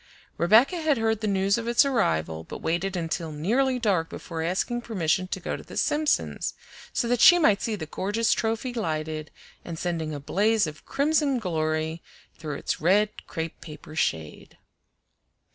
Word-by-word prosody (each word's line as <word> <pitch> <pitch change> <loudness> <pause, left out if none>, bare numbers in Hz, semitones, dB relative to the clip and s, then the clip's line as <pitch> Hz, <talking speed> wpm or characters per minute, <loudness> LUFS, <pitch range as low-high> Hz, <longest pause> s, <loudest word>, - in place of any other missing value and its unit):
Rebecca 225 - +5
had 310 -3 +2
heard 225 -1 0
the 215 - -1
news 195 +2 +2
of 230 - -5
its 240 +3 +4
arrival, 80 - 0
but - - -8
waited 180 +3 -1
until 165 -1 -3
nearly 245 - +1
dark 195 -9 +1
before 165 -2 -6
asking 190 +8 -1
permission 185 -5 0
to - - -4
go - - -3
to - - -8
the - - -10
Simpsons', 300 0 0 0.4
so 235 - -1
that 245 0 +1
she 350 - +9
might 210 - +3
see 225 -3 -1
the 170 -6 -5
gorgeous 205 +8 0
trophy 225 +3 -2
lighted 155 -7 -3 0.3
and 165 -2 -6
sending 165 -2 -2
a 145 - -4
blaze 210 +8 +2
of 150 -1 -9
crimson 290 -1 +2
glory 160 -4 -1 0.3
through 155 -2 -5
its - - -3
red 205 +5 +2
crepe 160 0 -5
paper 155 -1 -10
shade. 80 - -2
190 Hz, 165 wpm, -26 LUFS, 160-230 Hz, 0.4 s, she